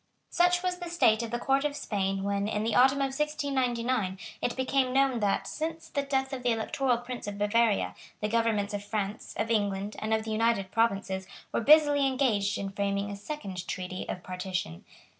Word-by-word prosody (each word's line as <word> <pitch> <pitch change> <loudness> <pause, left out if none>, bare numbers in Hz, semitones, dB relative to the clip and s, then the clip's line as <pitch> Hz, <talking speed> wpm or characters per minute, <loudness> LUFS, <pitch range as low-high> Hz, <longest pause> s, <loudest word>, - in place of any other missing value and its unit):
Such 355 0 +3
was 360 -1 -1
the 350 -1 -5
state 235 -10 +3
of 230 - -4
the 240 - -1
Court 270 +3 +1
of 295 -1 -1
Spain 195 -6 -1
when, 200 0 0
in 210 0 -1
the 225 0 0
autumn 265 +2 +5
of 270 -1 0
1699, 255 -8 0 0.2
it 240 - -1
became 260 0 +1
known 270 -3 +3
that, 205 -2 +1
since 320 +1 -4
the 280 - 0
death 270 -1 -1
of 260 - -4
the 245 - +1
Electoral 240 +2 +1
Prince 240 -1 -7
of 205 0 -4
Bavaria, 205 - +2 0.3
the 210 - -1
governments 220 -2 +1
of 205 0 -3
France, 205 0 -4
of 225 +1 -1
England 205 -1 0
and 220 - -3
of 220 0 +2
the 220 - -5
United 215 -3 +1
Provinces, 195 -4 0 0.3
were - - +1
busily 290 +1 +6
engaged 230 -7 +1
in 195 -1 -4
framing 200 0 -1
a - - -4
second 200 -5 -6
Treaty 185 0 -4
of 180 - -4
Partition. 180 - -4
225 Hz, 195 wpm, -29 LUFS, 200-270 Hz, 0.3 s, busily